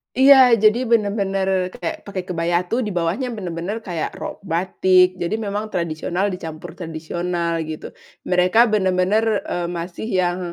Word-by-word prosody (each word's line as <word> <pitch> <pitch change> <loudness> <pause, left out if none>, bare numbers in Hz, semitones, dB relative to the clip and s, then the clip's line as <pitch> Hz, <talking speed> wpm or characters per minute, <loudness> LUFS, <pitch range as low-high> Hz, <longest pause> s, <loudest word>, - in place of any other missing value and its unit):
Iya, 270 +2 +8 0.3
jadi 215 +1 +6
bener-bener 200 -3 +1 0.3
kayak 170 +3 -5
pakai 195 -2 -4
kebaya 170 -1 -1
tuh 235 - 0
di 210 - -3
bawahnya 175 +10 -1
bener-bener 180 +1 -4
kayak 170 -4 -4
rok - - -7
batik, 185 +1 +4
jadi 175 +5 -1
memang 205 +2 -3
tradisional 170 +2 -1
dicampur 160 -3 -7
tradisional, 170 +1 -3
gitu. 155 -1 -7 0.3
Mereka 180 +4 +2
bener-bener, 190 +1 +2 0.2
eee, 175 -1 -3
masih 175 +5 -6
yang, 185 -4 0
180 Hz, 135 wpm, -21 LUFS, 170-200 Hz, 0.3 s, Iya